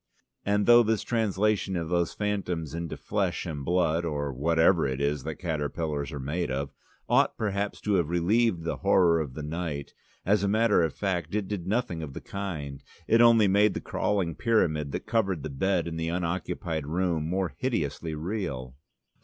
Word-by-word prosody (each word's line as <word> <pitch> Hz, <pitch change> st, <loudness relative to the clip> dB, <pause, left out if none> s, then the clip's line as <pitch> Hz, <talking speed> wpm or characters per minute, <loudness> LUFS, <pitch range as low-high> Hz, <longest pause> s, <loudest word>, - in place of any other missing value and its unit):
And 105 Hz, 0 st, +1 dB
though 120 Hz, 0 st, +8 dB
this 110 Hz, -2 st, +1 dB
translation 105 Hz, -3 st, 0 dB
of 85 Hz, -1 st, -3 dB
those 85 Hz, -1 st, +1 dB
phantoms 90 Hz, -7 st, -2 dB
into 85 Hz, -1 st, -4 dB
flesh 100 Hz, -4 st, -1 dB
and 75 Hz, -5 st, -5 dB
blood 85 Hz, 0 st, +1 dB
or 75 Hz, -4 st, -2 dB
whatever 80 Hz, +4 st, +3 dB
it 65 Hz, 0 st, -3 dB
is 70 Hz, -1 st, 0 dB
that 80 Hz, -1 st, -3 dB
caterpillars 75 Hz, -2 st, -3 dB
are 75 Hz, -, -5 dB
made 75 Hz, +6 st, -2 dB
of 70 Hz, +1 st, -2 dB, 0.4 s
ought -, -, +3 dB
perhaps 100 Hz, -1 st, -2 dB
to 105 Hz, -, 0 dB
have 85 Hz, -5 st, +2 dB
relieved 90 Hz, +2 st, +2 dB
the 85 Hz, -, -2 dB
horror 90 Hz, -4 st, +4 dB
of 70 Hz, -5 st, -4 dB
the 75 Hz, -, -5 dB
night, 75 Hz, -2 st, -4 dB, 0.3 s
as 100 Hz, +1 st, +3 dB
a -, -, +2 dB
matter 110 Hz, 0 st, +3 dB
of 80 Hz, -, 0 dB
fact 90 Hz, -3 st, -2 dB
it 105 Hz, -3 st, -1 dB
did 95 Hz, -4 st, -4 dB
nothing 105 Hz, -6 st, -1 dB
of 75 Hz, -4 st, -6 dB
the -, -, -6 dB
kind. 80 Hz, -9 st, -6 dB, 0.2 s
It 115 Hz, +2 st, +5 dB
only 115 Hz, -3 st, +6 dB
made 100 Hz, +2 st, +3 dB
the -, -, -1 dB
crawling 95 Hz, -5 st, -1 dB
pyramid 80 Hz, -10 st, +1 dB
that -, -, -4 dB
covered 95 Hz, -9 st, 0 dB
the 75 Hz, -, -4 dB
bed 90 Hz, +5 st, 0 dB
in 80 Hz, -1 st, -4 dB
the 80 Hz, 0 st, -2 dB
unoccupied 85 Hz, -3 st, -2 dB
room 85 Hz, -1 st, 0 dB
more 90 Hz, -4 st, -1 dB
hideously 80 Hz, -, -2 dB
real. 75 Hz, -, -4 dB
85 Hz, 180 wpm, -27 LUFS, 75-100 Hz, 0.4 s, though